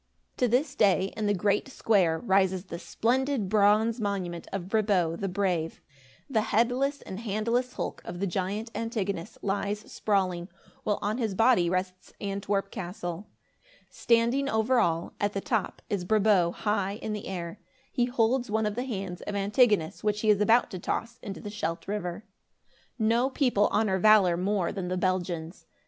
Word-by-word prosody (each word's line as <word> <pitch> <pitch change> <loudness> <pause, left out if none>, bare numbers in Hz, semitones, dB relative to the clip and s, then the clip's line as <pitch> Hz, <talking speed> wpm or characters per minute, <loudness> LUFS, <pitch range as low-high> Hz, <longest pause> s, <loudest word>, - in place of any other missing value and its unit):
To 250 - +2
this 260 +4 +1
day, 195 -6 +2
in 215 -1 -1
the 205 - +3
great 200 +4 +1
square, 190 -10 +2
rises 190 -2 +2
the 170 -3 -7
splendid 255 0 0
bronze 215 +3 +3
monument 185 -5 -3
of 190 -2 -4
Brabo 195 -6 +1
the 195 - -3
Brave. 180 -4 -1 0.5
The 225 -6 +1
headless 250 +6 +1
and 190 - -7
handless 230 +3 -1
hulk - - -4
of 175 0 -7
the 200 - 0
giant 200 +5 -2
Antigonus 205 -6 -3
lies 205 +1 -1
sprawling, 185 -4 0 0.3
while 210 - 0
on 215 +4 -1
his 220 -5 -1
body 225 -5 +4
rests 185 0 -3
Antwerp 195 0 -2
castle. 175 +1 -5 0.6
Standing 235 +4 +2
over 225 +2 +2
all, 170 -5 0
at 205 0 0
the 195 - -1
top, 225 -7 -2
is 200 -3 -2
Brabo 200 -3 +3
high 200 0 -1
in 215 0 -4
air. 180 -4 -5 0.3
He 245 - +1
holds 245 0 +1
one 220 +1 +1
of 210 - -1
the 245 +4 -3
hands 195 -7 -5
of 205 - -3
Antigonus, 205 -4 +2
which 210 0 0
he 215 - +4
is 205 0 +2
about 230 +3 +4
to 185 - -5
toss 235 +6 -3
into 200 -5 -7
the 205 - -6
Scheldt 165 -5 -4
River. 200 0 -4 0.7
No 230 +3 +2
people 250 -7 +2
honor 205 -3 +2
valor 200 -3 +6
more 185 0 0
than 190 -3 -4
the 185 +1 -1
Belgians. 175 -2 -2
205 Hz, 165 wpm, -28 LUFS, 185-225 Hz, 0.7 s, valor